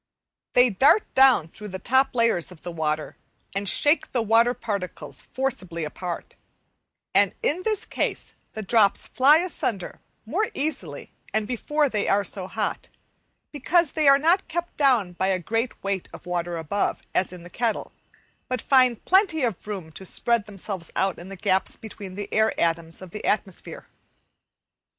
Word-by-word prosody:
They 245 Hz, -1 st, +5 dB
dart 275 Hz, -, +5 dB
down 260 Hz, -11 st, +5 dB
through 210 Hz, +5 st, -10 dB
the 190 Hz, -2 st, -5 dB
top 260 Hz, +7 st, +2 dB
layers 230 Hz, -8 st, +2 dB
of 175 Hz, -, -15 dB
the 175 Hz, -, -5 dB
water, 155 Hz, -2 st, -2 dB, 0.4 s
and 195 Hz, 0 st, -1 dB
shake 295 Hz, +3 st, +2 dB
the 240 Hz, -3 st, +1 dB
water 230 Hz, +3 st, +4 dB
particles 180 Hz, -, -5 dB
forcibly 195 Hz, -11 st, -2 dB
apart; 170 Hz, +3 st, -6 dB, 0.8 s
and -, -, +3 dB
in 340 Hz, +5 st, +2 dB
this 425 Hz, +1 st, +1 dB
case -, -, -2 dB, 0.2 s
the 220 Hz, -, -5 dB
drops 205 Hz, 0 st, +3 dB
fly 280 Hz, +4 st, +5 dB
asunder 300 Hz, -, -3 dB, 0.2 s
more 375 Hz, -, 0 dB
easily 265 Hz, -, -3 dB, 0.2 s
and 215 Hz, -1 st, 0 dB
before 295 Hz, +5 st, 0 dB
they 210 Hz, -6 st, -1 dB
are 200 Hz, +1 st, +3 dB
so 185 Hz, -1 st, -3 dB
hot, 210 Hz, +1 st, -3 dB, 0.6 s
because 330 Hz, +2 st, +2 dB
they 310 Hz, -2 st, +2 dB
are 275 Hz, 0 st, +8 dB
not 335 Hz, +7 st, +2 dB
kept 345 Hz, +2 st, -4 dB
down 245 Hz, -11 st, +3 dB
by 190 Hz, +2 st, -1 dB
a 190 Hz, -1 st, +2 dB
great 225 Hz, +7 st, -3 dB
weight 195 Hz, -2 st, -2 dB
of -, -, -11 dB
water 175 Hz, -1 st, -2 dB
above, 165 Hz, +5 st, -1 dB
as 185 Hz, -, +1 dB
in 180 Hz, -2 st, -10 dB
the 175 Hz, -, -11 dB
kettle, 235 Hz, -3 st, -1 dB, 0.6 s
but 255 Hz, -2 st, -2 dB
find 255 Hz, -2 st, +3 dB
plenty 370 Hz, -6 st, +3 dB
of 225 Hz, -5 st, -2 dB
room 190 Hz, -6 st, -5 dB
to 190 Hz, -, -10 dB
spread 230 Hz, +3 st, 0 dB
themselves 195 Hz, -3 st, -5 dB
out 190 Hz, -1 st, 0 dB
in 175 Hz, +2 st, -10 dB
the 195 Hz, -, -7 dB
gaps 190 Hz, 0 st, +1 dB
between 200 Hz, -4 st, -9 dB
the 205 Hz, +1 st, -4 dB
air 220 Hz, 0 st, +2 dB
atoms 165 Hz, +1 st, -1 dB
of 185 Hz, -, -11 dB
the 210 Hz, -, -7 dB
atmosphere. 195 Hz, -3 st, -3 dB
210 Hz, 165 wpm, -25 LUFS, 185-265 Hz, 0.8 s, are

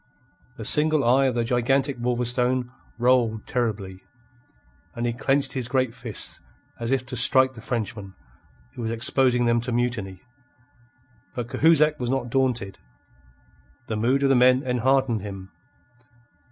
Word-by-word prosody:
The -, -, -8 dB
single 155 Hz, -1 st, +3 dB
eye 130 Hz, +3 st, +3 dB
of 125 Hz, -, -2 dB
the 120 Hz, -, 0 dB
gigantic 130 Hz, +3 st, 0 dB
Wolverstone 125 Hz, +1 st, 0 dB, 0.3 s
rolled 120 Hz, -3 st, +1 dB
terribly, 100 Hz, -6 st, -3 dB, 0.9 s
and 120 Hz, 0 st, -3 dB
he 120 Hz, -, -1 dB
clenched 135 Hz, +2 st, 0 dB
his 130 Hz, -3 st, -3 dB
great 130 Hz, -2 st, 0 dB
fists 120 Hz, -4 st, -1 dB, 0.4 s
as 115 Hz, 0 st, -4 dB
if 130 Hz, -1 st, 0 dB
to 125 Hz, -, -7 dB
strike 130 Hz, +2 st, +4 dB
the 115 Hz, -, -12 dB
Frenchman, 105 Hz, -4 st, -5 dB, 0.6 s
who 125 Hz, -, -8 dB
was 110 Hz, -, -3 dB
exposing 125 Hz, +1 st, +1 dB
them 120 Hz, 0 st, +2 dB
to 125 Hz, +1 st, -4 dB
mutiny. 115 Hz, -6 st, -3 dB, 1.1 s
But 120 Hz, -1 st, -5 dB
Cahusac 155 Hz, -1 st, +3 dB
was 125 Hz, -1 st, -3 dB
not 125 Hz, -2 st, -2 dB
daunted. 120 Hz, -7 st, -1 dB, 1.1 s
The 110 Hz, -, -4 dB
mood 125 Hz, +6 st, +1 dB
of 135 Hz, -, +3 dB
the 135 Hz, -, +4 dB
men 125 Hz, +2 st, +4 dB
enheartened 125 Hz, -2 st, +1 dB
him. 95 Hz, -1 st, -9 dB
125 Hz, 140 wpm, -24 LUFS, 115-130 Hz, 1.1 s, strike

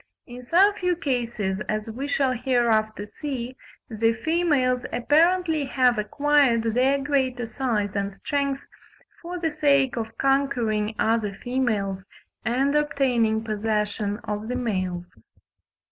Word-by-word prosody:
In 245 Hz, 0 st, -10 dB
some 375 Hz, +10 st, +4 dB
few 360 Hz, -2 st, 0 dB
cases, 235 Hz, -, -2 dB
as 215 Hz, 0 st, -1 dB
we 245 Hz, +5 st, -5 dB
shall 275 Hz, -2 st, +1 dB
hereafter 225 Hz, -4 st, +1 dB, 0.2 s
see, 260 Hz, -4 st, -4 dB, 0.3 s
the 225 Hz, 0 st, +1 dB
females 295 Hz, -7 st, +2 dB
apparently 320 Hz, +3 st, +2 dB
have 255 Hz, -3 st, +2 dB
acquired 275 Hz, +1 st, +2 dB
their 260 Hz, +3 st, +3 dB
greater 265 Hz, -4 st, 0 dB
size 225 Hz, -4 st, -1 dB
and 200 Hz, -1 st, -2 dB
strength 280 Hz, +3 st, -2 dB, 0.6 s
for 355 Hz, +1 st, -5 dB
the 330 Hz, -2 st, -1 dB
sake 280 Hz, -4 st, +2 dB
of 225 Hz, -1 st, -5 dB
conquering 240 Hz, -6 st, +1 dB
other 220 Hz, -3 st, +1 dB
females 220 Hz, -7 st, -1 dB, 0.4 s
and 270 Hz, +5 st, +1 dB
obtaining 250 Hz, -7 st, +1 dB
possession 210 Hz, -1 st, -1 dB
of 210 Hz, 0 st, -4 dB
the 250 Hz, -, -2 dB
males. 185 Hz, -7 st, -2 dB
245 Hz, 120 wpm, -24 LUFS, 220-280 Hz, 0.6 s, some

